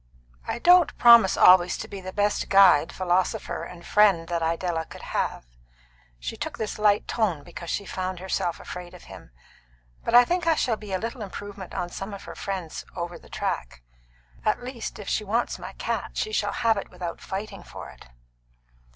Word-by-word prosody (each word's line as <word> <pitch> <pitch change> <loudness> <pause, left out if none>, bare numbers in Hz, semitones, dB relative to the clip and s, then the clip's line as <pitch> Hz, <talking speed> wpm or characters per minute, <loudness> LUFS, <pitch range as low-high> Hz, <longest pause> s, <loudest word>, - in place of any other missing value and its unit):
"I - - -2
don't 350 +4 +5
promise 235 -5 +7
always 180 -1 +6
to - - -6
be 200 -2 -8
the 185 0 -6
best 205 +1 0
guide, 190 -6 +6
philosopher, 185 0 -1
and 175 -1 -10
friend 195 -6 +4
that 170 -1 -1
Idella 165 0 -1
could - - -12
have" - - -1 0.7
she - - -5
took - - -5
this 215 -1 -4
light 210 -1 +3
tone 190 -11 0
because 170 -1 -9
she 200 - -2
found 185 -1 -4
herself 180 -1 -2
afraid 180 0 -8
of 180 - -14
him 95 -9 -12 0.7
"but 230 - +1
I 245 0 +9
think 350 +2 -1
I 325 - +5
shall 245 -6 +1
be 210 -2 -10
a 190 - +1
little 230 +4 -5
improvement 200 -1 -8
on 175 - -2
some 195 +3 -6
of 200 - -11
her - - -8
friends 190 -5 -5
Over 175 -1 -5
the - - -18
Track. - - -4 0.6
At - - 0
least, 245 -2 -6
if 205 - -9
she 215 - 0
wants 225 +4 -1
my - - -8
cat, - - -4
she 435 - -1
shall 435 - 0
have 225 -2 +2
it 200 - -5
without 175 -2 -6
fighting 195 -1 -6
for - - -10
it." - - -16
190 Hz, 190 wpm, -25 LUFS, 175-215 Hz, 0.7 s, I